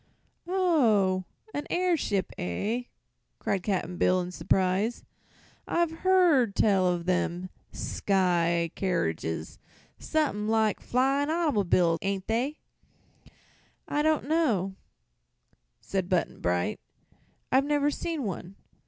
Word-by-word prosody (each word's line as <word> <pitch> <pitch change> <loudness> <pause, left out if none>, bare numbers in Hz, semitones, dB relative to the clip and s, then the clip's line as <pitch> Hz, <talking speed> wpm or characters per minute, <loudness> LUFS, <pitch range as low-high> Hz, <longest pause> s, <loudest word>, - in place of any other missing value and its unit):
"Oh; 230 - +2 0.3
a 290 - -2
airship, 335 - 0
eh?" 210 - -2 0.5
cried 195 - -1
Cap'n 180 -2 -2
Bill, 185 +1 +3
in 180 0 -4
surprise. 190 +5 0 0.6
"I've 340 -1 +1
hearn 345 - +4
tell 195 -3 +3
o' 180 -1 +2
them 180 +1 -1 0.2
sky 170 -4 +1
keeridges; 80 - -2 0.4
someth'n' 285 -10 0
like 220 -2 +2
flyin' 275 +3 +1
autymob'l's, 200 - +2
ain't 195 -1 -2
they?" 250 +7 -1 1.3
"I 295 - 0
don't 310 -2 +1
know," 235 - +1 1.1
said 190 -2 -2
Button 180 -3 0
Bright; 90 0 -1 0.7
"I've 265 +2 +4
never 290 0 +2
seen 320 -1 -3
one." 190 -2 -5
205 Hz, 100 wpm, -28 LUFS, 180-290 Hz, 1.3 s, hearn